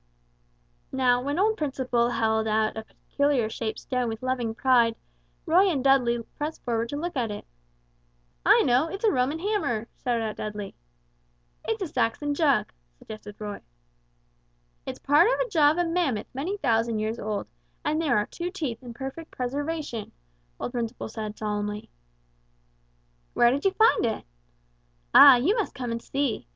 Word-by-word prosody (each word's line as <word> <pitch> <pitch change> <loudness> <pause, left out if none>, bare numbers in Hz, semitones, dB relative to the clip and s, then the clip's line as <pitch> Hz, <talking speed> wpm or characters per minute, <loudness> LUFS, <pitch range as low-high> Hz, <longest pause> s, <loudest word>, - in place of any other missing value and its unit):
Now 250 -2 +2
when 285 +4 -2
old 435 +3 +2
Principle 255 -5 0
held 220 -2 +1
out 215 0 +1
a 220 0 -6
peculiar 280 -5 -1
shaped 220 -1 -3
stone 250 -2 -2
with 225 +2 -6
loving 245 -3 -1
pride, 240 -3 +3 0.5
Roy 365 +4 +4
and 280 -7 -1
Dudley 245 -4 +3 0.2
pressed 300 +2 -4
forward 230 -1 -1
to 285 - -4
look 345 +3 -4
at 240 -4 0
it. 205 - -6 1.0
"I - - +6
know, 255 +5 +3
it's 390 +5 -7
a 440 - +4
Roman 260 +4 +1
hammer," 325 - -1 0.2
shouted 235 -2 0
out 215 -1 -4
Dudley. 210 -2 -5 0.9
"It's 445 -3 -1
a - - -3
Saxon 290 +2 -1
jug," 285 -3 +2 0.2
suggested 210 - -10
Roy. 210 -1 -6 1.3
"It's - - -4
part 295 +7 +4
of - - 0
a - - 0
jaw 310 -7 +5
of 310 - 0
a 350 - +2
mammoth 330 -11 -1
many 325 +10 -3
thousands 230 - +1
of - - -1
years 220 +2 -2
old, 210 -1 -3 0.4
and 310 +2 +1
there 305 -9 +2
are 210 - +1
two 345 +8 -5
teeth 295 - -4
in 240 -2 -9
perfect 270 +5 -7
preservation," 285 -2 -4 0.5
old - - -4
Principle 235 -2 -4
said 215 -1 -6
solemnly. 210 0 -3 1.4
"Where 240 0 +5
did 280 +6 -2
you 390 - +4
find 440 +3 +4
it?" 225 - -3 0.9
"Ah, 275 -2 +10
you 295 - +2
must 435 -5 -2
come 245 -2 -4
and 230 0 -3
see! 275 - -2
250 Hz, 165 wpm, -26 LUFS, 225-305 Hz, 1.4 s, Ah